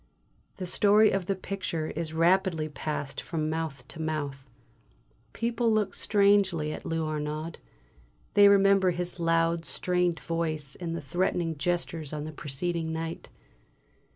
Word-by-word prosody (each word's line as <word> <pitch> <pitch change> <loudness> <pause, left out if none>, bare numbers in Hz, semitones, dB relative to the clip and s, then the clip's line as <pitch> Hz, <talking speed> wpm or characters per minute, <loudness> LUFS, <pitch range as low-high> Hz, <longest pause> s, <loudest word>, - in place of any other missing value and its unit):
The 185 - -4
story 210 +4 +4
of 190 -2 -1
the 195 - +1
picture 185 -4 -3
is 160 0 -3
rapidly 170 -1 +2
passed 145 -1 -4
from 155 -2 -2
mouth 155 -6 -4
to 160 - -7
mouth. 145 -4 -3 0.8
People 230 0 0
look 215 -2 +1
strangely 200 -7 +2
at - - -8
Lou 165 -1 -1
Arnaud; 155 +1 -4 0.7
they 205 0 +8
remember 195 -1 +5
his 180 0 -3
loud, 165 0 +2
strained 180 -1 0
voice 155 -4 -2
and 170 -2 -5
threatening 170 +2 0
gestures 165 -1 -2
on 150 -1 -3
the 155 - -5
preceding 160 +3 -3
night. 165 +1 -5
165 Hz, 130 wpm, -28 LUFS, 155-185 Hz, 0.8 s, they